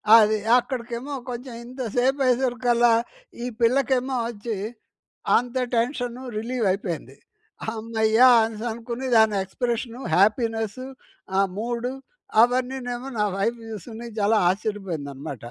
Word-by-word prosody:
అది, 215 Hz, -1 st, +6 dB, 0.2 s
అక్కడికేమో 245 Hz, +1 st, -3 dB, 0.2 s
కొంచెం 250 Hz, +1 st, -6 dB
ఇంత 255 Hz, +2 st, -8 dB
సేపయ్యేసరికల్లా, 245 Hz, -2 st, +3 dB, 0.5 s
ఈ -, -, -2 dB, 0.2 s
పిల్లకేమో 260 Hz, +2 st, +2 dB
వచ్చి, 225 Hz, -1 st, -4 dB, 0.8 s
అంత 245 Hz, +1 st, -2 dB, 0.2 s
టెన్షనూ 245 Hz, +1 st, -1 dB
రిలీ‌వయిపోయింది. 195 Hz, -, -2 dB, 0.5 s
హమ్మయ్య! 220 Hz, 0 st, 0 dB, 0.2 s
అనేసనుకుని, 230 Hz, +3 st, -4 dB
దాని 220 Hz, -1 st, +5 dB
ఎక్స్‌ప్రెషను, 235 Hz, +4 st, -3 dB
హ్యాపీనెస్సు, 225 Hz, +3 st, +1 dB, 0.5 s
ఆ -, -, +6 dB, 0.2 s
మూడు, 240 Hz, +2 st, -2 dB, 0.5 s
అవన్నీనేమో 250 Hz, +1 st, 0 dB
నా 210 Hz, -, +3 dB
వైవ్ 225 Hz, +4 st, 0 dB
చూసుకుని, 220 Hz, +3 st, -8 dB
జాలా 210 Hz, +2 st, +3 dB
ఆశ్చర్యపోయిందనమాట. 165 Hz, -, -4 dB
235 Hz, 95 wpm, -24 LUFS, 215-250 Hz, 0.8 s, అది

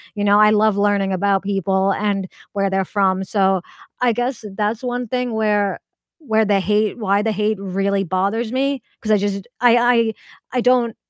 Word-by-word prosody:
you 205 Hz, -, -2 dB
know, 205 Hz, +1 st, +4 dB
I 210 Hz, 0 st, +6 dB
love 215 Hz, -1 st, +3 dB
learning 200 Hz, -1 st, +1 dB
about 195 Hz, +1 st, +1 dB
people 195 Hz, 0 st, 0 dB
and 200 Hz, -2 st, -1 dB, 0.3 s
where 195 Hz, -1 st, 0 dB
they're 195 Hz, 0 st, +1 dB
from, 190 Hz, -1 st, 0 dB
so 190 Hz, -2 st, +1 dB, 0.4 s
I 250 Hz, -1 st, +3 dB
guess 245 Hz, +1 st, -3 dB
that's 215 Hz, +2 st, -1 dB
one 245 Hz, -1 st, -3 dB
thing 250 Hz, 0 st, -2 dB
where 210 Hz, -2 st, 0 dB, 0.5 s
where 220 Hz, -3 st, +2 dB
the 200 Hz, -1 st, +2 dB
hate 210 Hz, +2 st, 0 dB
why 200 Hz, -2 st, +1 dB
the 220 Hz, 0 st, -1 dB
hate 210 Hz, +1 st, 0 dB
really 195 Hz, +1 st, -1 dB
bothers 200 Hz, +6 st, -1 dB
me 270 Hz, -1 st, 0 dB, 0.2 s
'cause 215 Hz, -, -2 dB
I 210 Hz, -, +5 dB
just 200 Hz, -1 st, -2 dB, 0.2 s
I 240 Hz, -1 st, +5 dB
I 235 Hz, -2 st, +3 dB, 0.4 s
I -, -, +2 dB
don't 245 Hz, -2 st, +2 dB
210 Hz, 185 wpm, -20 LUFS, 195-225 Hz, 0.5 s, I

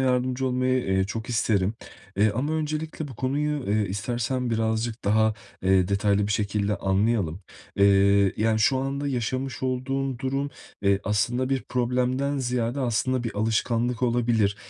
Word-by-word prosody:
yardımcı 130 Hz, 0 st, +1 dB
olmayı, 130 Hz, 0 st, +1 dB
eee, 95 Hz, 0 st, +1 dB
çok 110 Hz, +4 st, -5 dB
isterim. 110 Hz, -3 st, +1 dB, 0.4 s
Eee, 105 Hz, +2 st, +4 dB
ama 140 Hz, +6 st, -1 dB
öncelikle 155 Hz, 0 st, -3 dB
bu 130 Hz, -, -9 dB
konuyu, 145 Hz, +2 st, -1 dB
eee, 105 Hz, -1 st, +1 dB
istersen 120 Hz, +5 st, -2 dB
birazcık 110 Hz, +1 st, -1 dB
daha, 110 Hz, +1 st, +3 dB, 0.3 s
eee, 95 Hz, -1 st, +3 dB
detaylı 100 Hz, 0 st, +2 dB
bir 105 Hz, -, -1 dB
şekilde 105 Hz, 0 st, 0 dB
anlayalım. 95 Hz, -3 st, 0 dB, 0.4 s
Eee, 100 Hz, 0 st, +4 dB
yani, 110 Hz, +1 st, +2 dB
şu 110 Hz, +5 st, +3 dB
anda 140 Hz, +2 st, -2 dB
yaşamış 130 Hz, +1 st, -2 dB
olduğun 130 Hz, 0 st, -1 dB
durum, 135 Hz, +2 st, -2 dB, 0.3 s
eee, 100 Hz, 0 st, +3 dB
aslında 120 Hz, +5 st, 0 dB
bir 135 Hz, -1 st, 0 dB
problemden 125 Hz, +3 st, 0 dB
ziyade, 125 Hz, 0 st, -1 dB
aslında, 130 Hz, +1 st, 0 dB
bir 115 Hz, -, -4 dB
alışkanlık 115 Hz, +3 st, 0 dB
olabilir. 115 Hz, -4 st, +2 dB
120 Hz, 145 wpm, -25 LUFS, 105-130 Hz, 0.4 s, Eee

